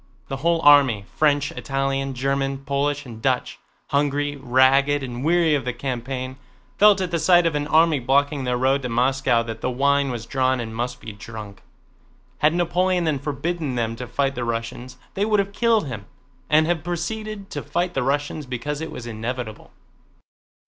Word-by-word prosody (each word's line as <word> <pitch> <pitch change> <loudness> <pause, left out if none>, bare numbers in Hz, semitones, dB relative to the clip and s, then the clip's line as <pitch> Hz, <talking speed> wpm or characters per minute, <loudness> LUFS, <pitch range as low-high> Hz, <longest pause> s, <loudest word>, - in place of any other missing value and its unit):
The 135 - -3
whole 165 +3 +1
army—French, 145 +1 +4
Italian, 135 0 -2
German, 135 +1 -1
Polish, 140 +1 -1
and 115 -3 -10
Dutch—hungry, 145 +3 -1
ragged, 135 +2 +3
and 125 -1 -5
weary 165 0 +3
of 140 -3 +1
the 125 0 -2
campaign, 130 +1 -4 0.4
felt 205 -2 +6
at 180 -1 -2
the 170 - 0
sight 175 +2 +5
of 165 - +2
an 145 0 -1
army 160 -1 +4
blocking 140 +3 +1
their 125 -1 0
road 135 +2 +2
to 125 - -4
Moscow 125 0 +2
that 115 -1 -7
the - - -1
wine 140 +2 +2
was 120 -2 -5
drawn 130 0 +1
and 110 -1 -5
must 125 +1 -3
be 110 - -7
drunk. 105 -1 -10 0.8
Had 155 +2 +3
Napoleon 175 +1 +1
then 155 -4 0
forbidden 150 0 -3
them 115 -1 -1
to 125 +1 -6
fight 135 +3 0
the 125 - -4
Russians, 115 +2 -4 0.2
they 200 - -1
would 210 0 +2
have 200 0 -1
killed 230 -3 +2
him 110 -7 -7 0.4
and 155 0 +5
have 165 -2 -1
proceeded 200 +4 -4
to 145 - -4
fight 175 +3 -2
the 135 - 0
Russians 145 +2 -1
because 145 +4 -4
it 160 - -4
was 120 - -8
inevitable. 115 0 -5
135 Hz, 175 wpm, -23 LUFS, 125-155 Hz, 0.8 s, felt